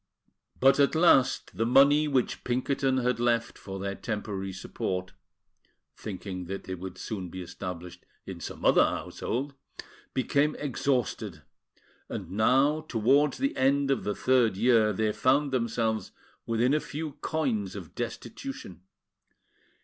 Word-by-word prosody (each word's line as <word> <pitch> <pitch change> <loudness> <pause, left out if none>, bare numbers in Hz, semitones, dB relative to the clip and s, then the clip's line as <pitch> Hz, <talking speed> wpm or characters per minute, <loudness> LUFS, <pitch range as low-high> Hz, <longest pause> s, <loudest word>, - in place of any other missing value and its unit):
But, 135 +2 +5
at 140 +2 +4
last, 160 -6 +4
the 115 - 0
money 140 +4 +5
which 135 -4 0
Pinkerton 130 +2 0
had 125 -1 +1
left 120 -1 +1
for 95 -1 -8
their 100 +1 -3
temporary 100 -2 -4
support 90 0 -4 0.8
(thinking 95 -3 -6
that 95 +2 -5
they 95 - -5
would 95 0 -7
soon 95 -5 -5
be 95 +1 -6
established 90 0 -7 0.2
in - - -7
some - - -7
other - - +6
household) 135 +4 -3 0.6
became 140 +3 +2
exhausted; 135 -3 -2 0.7
and - - -6
now, 135 +9 +3
towards 135 +6 +3
the 275 +1 -1
end 140 +1 +2
of 135 - 0
the 105 - -2
third 125 -6 +2
year, 115 -2 +4
they 110 +2 0
found 135 +4 +2
themselves 115 -4 -1 0.4
within 115 +4 +2
a 150 - +3
few 155 +1 -5
coins 120 - -1
of 90 -5 -8
destitution. 120 - -6
120 Hz, 135 wpm, -28 LUFS, 100-140 Hz, 0.8 s, other